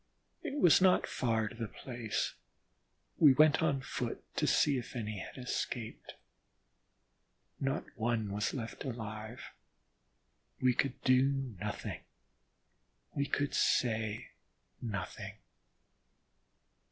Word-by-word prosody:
It 295 -3 -4
was 180 - +6
not 185 -1 +5
far 110 -3 0
to - - -7
the 115 -1 -4
place: 120 -2 -3 0.9
we 145 -4 +9
went 155 +1 +5
on 135 -1 +2
foot 125 -2 -4
to - - +2
see 140 -3 +4
if 120 - -9
any 105 -4 -3
had - - -8
escaped. 125 -2 -4 1.4
Not 135 +4 0
one 115 -3 0
was 105 +1 0
left 115 -4 -5
alive. 110 -3 -6 1.1
We 130 -1 +4
could 135 +1 0
do 130 0 +3
nothing - - -4 1.1
we 140 0 0
could 145 0 0
say 110 -1 +1 0.5
nothing. 100 -6 -4
125 Hz, 105 wpm, -33 LUFS, 110-135 Hz, 1.4 s, we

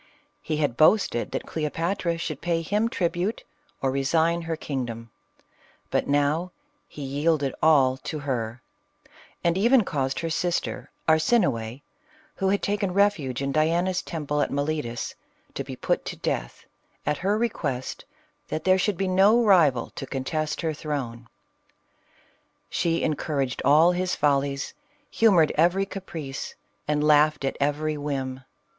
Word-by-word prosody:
He 155 - -2
had 145 -6 0
boasted 155 - +3
that - - -4
Cleopatra 165 +3 -2
should 155 -4 -4
pay 170 -1 0
him 210 +6 +1
tribute 175 +2 -1 0.4
or 135 - +2
resign 160 +5 +1
her 165 -1 -3
kingdom; 120 -7 -5 0.8
but - - +1
now 145 +5 +1 0.4
he 145 - -9
yielded 145 0 0
all 135 -5 +5
to 155 +4 -5
her, 125 -5 -3 0.8
and 170 +2 +2
even 235 +3 +5
caused 135 -6 -2
her 165 - -2
sister 175 +1 -2 0.2
Arsinoe, 150 - +2 0.6
who 195 -1 +1
had 200 +1 +1
taken 200 -2 -1
refuge 155 -11 +1
in 140 - -1
Diana's 170 +5 +1
temple 150 -3 -2
at - - +1
Miletus, 140 -4 -2 0.4
to - - -3
be - - -7
put - - -1
to - - -4
death, - - -4 0.4
at 150 0 0
her 200 +3 +1
request, 155 - -2 0.4
that 155 - -3
there 185 0 +4
should 200 -1 0
be 195 - 0
no 200 +6 +5
rival 160 - +4
to 135 - -7
contest 150 +4 -2
her 160 -2 -1
throne. 130 -6 -5 1.4
She 170 -1 0
encour 150 -2 0
aged 130 -1 -4
all 155 +5 +6
his 180 0 -1
follies, 140 -1 0 0.4
humored 185 -9 +4
every 175 +5 +3
caprice, 165 -8 -6 0.3
and 150 0 +1
laughed 150 -1 +4
at 135 - -1
every 150 +2 0
whim. 135 -3 -3
155 Hz, 140 wpm, -25 LUFS, 140-175 Hz, 1.4 s, all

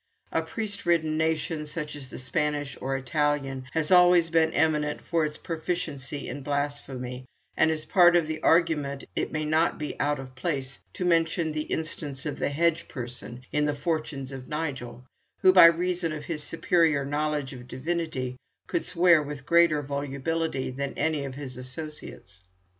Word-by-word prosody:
A 165 - +1
priest 200 +4 -5
ridden 160 -2 +2
nation, 160 -1 -1
such 150 -1 -5
as 135 -3 -9
the - - -8
Spanish 145 +1 -1
or 135 +1 -1
Italian, 135 -1 -1
has 160 0 0
always 180 -2 +6
been 160 -1 +4
eminent 150 -1 +1
for 165 -2 0
its 150 0 -4
proficiency 155 -4 -4
in 140 +3 -5
blasphemy; 135 -3 -3 0.3
and 160 - +4
as 155 -1 -1
part 175 -2 +6
of 170 -2 +4
the 155 0 -4
argument 150 -5 +2
it - - -1
may 155 0 -2
not 160 +2 +2
be 150 -2 -5
out 145 0 +1
of 130 -1 -9
place 135 -1 -3
to 180 - -3
mention 165 -1 +2
the 155 0 -3
instance 150 -3 -3
of 150 - -4
the - - +1
hedge 170 +3 +1
parson 125 -1 -7
in 150 0 +2
the 145 0 0
'Fortunes 145 -3 -3
of 130 -1 -8
Nigel,' 135 -6 -4 0.4
who, 185 - +7
by 180 -2 +10
reason 175 0 +3
of 150 -1 -5
his 160 -3 -3
superior 165 -2 +2
knowledge 145 -1 -1
of 125 -1 -10
divinity, 130 -3 -3 0.3
could 170 - -1
swear 170 -2 +5
with 145 -1 -7
greater 170 -3 +4
volubility 140 +1 -2
than 140 +1 -4
any 155 -3 0
of 135 -1 -6
his 135 -3 -7
associates. 130 - -8
150 Hz, 170 wpm, -27 LUFS, 135-165 Hz, 0.4 s, by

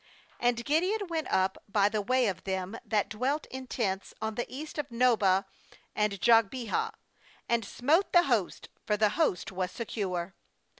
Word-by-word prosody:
uAnd 240 -1 +1
Gideon 370 +8 +1
went 320 -2 -2
up 190 0 +1
by 200 -1 +3
the 210 0 -1
way 255 +4 +2
of 185 -4 -2
them 190 +1 -3
that 210 -2 0
dwelt 265 +8 -1
in 260 0 -6
tents 195 -6 -2
on 220 0 -2
the 240 +2 -3
east 300 +3 -6
of 290 - -3
Nobah 220 -6 +3 0.5
and 210 -2 0
Jogbehah, 235 - +2 0.5
and 235 -1 +1
smote 295 - +1
the 350 -1 +6
host; 235 - -1
for 210 - 0
the 210 0 +4
host 210 - 0
was 185 -1 -2
secure. 190 -4 -3
225 Hz, 160 wpm, -29 LUFS, 195-260 Hz, 0.5 s, the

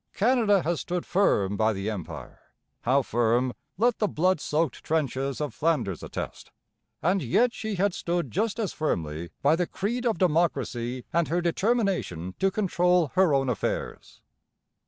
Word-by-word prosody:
Canada 215 -4 +3
has 170 0 -1
stood 180 0 -3
firm 105 - +2
by 110 +2 +2
the 95 +1 -4
Empire 100 -7 -6 0.5
how 135 +3 +3
firm 120 +2 +1 0.2
let 235 +3 +2
the 210 - +2
blood 185 -1 +1
soaked 155 +3 -1
trenches 140 -3 -1
of 150 -2 -3
Flanders 130 - 0
attest - - -6 0.5
and 180 +4 +2
yet 235 - +2
she 220 -2 -4
had 195 +1 +1
stood 175 0 -2
just 215 +3 0
as 220 -5 -2
firmly 85 - -2
by 145 +3 +5
the 175 0 -1
creed 235 +6 -2
of 225 - +1
democracy 135 -8 0
and 170 0 +2
her 170 +3 0
determination 175 - 0
to 195 - +3
control 180 -5 +2
her 185 -3 +4
own 135 -1 +2
affairs. 125 -5 -3
165 Hz, 155 wpm, -27 LUFS, 125-195 Hz, 0.5 s, by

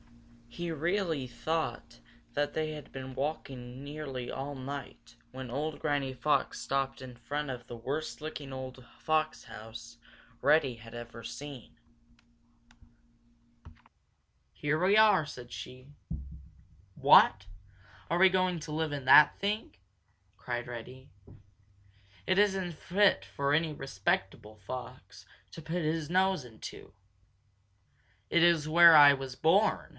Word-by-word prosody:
He 170 +9 -6
really 165 -3 -1
thought 155 - -3 0.3
that 145 0 -1
they 155 0 -2
had 150 -1 -9
been 130 -1 -7
walking 130 -3 -5
nearly 140 -4 -6
all 140 +2 -5
night 130 -3 -8 0.2
when 130 -1 -7
old 145 +5 -3
Granny 145 -3 -1
Fox 145 +4 0
stopped 135 -1 -2
in 130 -2 -9
front 145 +5 -4
of 125 -2 -7
the 120 - -7
worst 140 +7 -4
looking 150 -3 -7
old 130 -1 -7
fox 155 0 -1
house 115 +1 -10 0.4
Reddy 145 -4 +3
had 115 0 -13
ever 120 0 -9
seen. 125 +3 -9 2.7
"Here 155 +3 -1
we 200 +3 +4
are!" 210 -7 +5
said 125 -4 -10
she. 130 +1 -9 1.1
"What! 95 - +6 0.6
Are 170 - +1
we 190 +2 +7
going 185 -2 +1
to 150 -1 -7
live 160 0 -1
in 140 -2 -5
that 150 +3 +7
thing?" 205 - -2 0.6
cried 120 0 -5
Reddy. 125 +2 -9 1.2
"It 185 - +2
isn't 190 -4 +1
fit 185 - +2
for 140 +9 -2
any 160 +1 +2
respectable 105 -6 -3
fox 125 +5 -9 0.3
to 165 - -9
put 165 +2 -3
his 155 0 -1
nose 185 -3 +2
into." 115 -3 -10 1.4
"It 170 - +4
is 170 -3 +4
where 170 +1 +8
I 145 -1 +9
was 135 -2 -6
born!" 190 +9 +2
145 Hz, 125 wpm, -30 LUFS, 125-160 Hz, 2.7 s, I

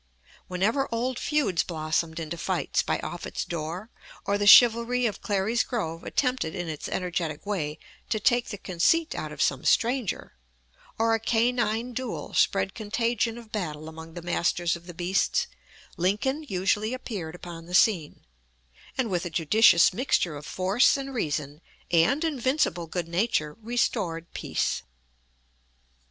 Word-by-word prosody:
Whenever 215 +10 0
old 245 +2 -1
feuds 290 - +1
blossomed 160 0 -2
into 160 +1 -4
fights 170 -3 0
by - - -1
Offutt's - - -4
door, 170 +6 -5 0.3
or 200 - +1
the 205 - +1
chivalry 240 +2 +7
of 215 - -2
Clary's 205 +3 +1
Grove 165 -9 -4
attempted 250 - -1
in 175 -2 -4
its 155 -2 -5
energetic 170 -4 -3
way 155 -7 -2 0.3
to 215 - 0
take 240 +3 +2
the 205 - -5
conceit 205 - +1
out - - -5
of - - -1
some - - 0
stranger, 240 -3 +1 0.6
or 225 0 +2
a 225 - +2
canine 235 +1 +1
duel 255 -1 -5
spread 195 -1 +2
contagion 230 +1 -1
of 230 -2 -12
battle 155 -7 -4
among 160 +1 -10
the 175 - -7
masters 175 0 0
of 170 +1 -12
the 175 - -9
beasts, 190 - +1 0.5
Lincoln 210 - 0
usually 205 +5 0
appeared 190 -10 -6
upon 170 -2 -9
the 180 - -2
scene, 185 -7 +2 0.7
and 260 -3 +1
with 180 -4 -1
a 175 - -3
judicious 170 +2 +5
mixture 180 - +1
of 145 0 -9
force 195 +9 +3
and 275 0 -5
reason 150 - -3 0.3
and 215 - +3
invincible 260 - 0
good 170 +1 -3
nature 170 -4 0
restored 205 -8 -1
peace. - - -1
195 Hz, 145 wpm, -27 LUFS, 170-235 Hz, 0.7 s, chivalry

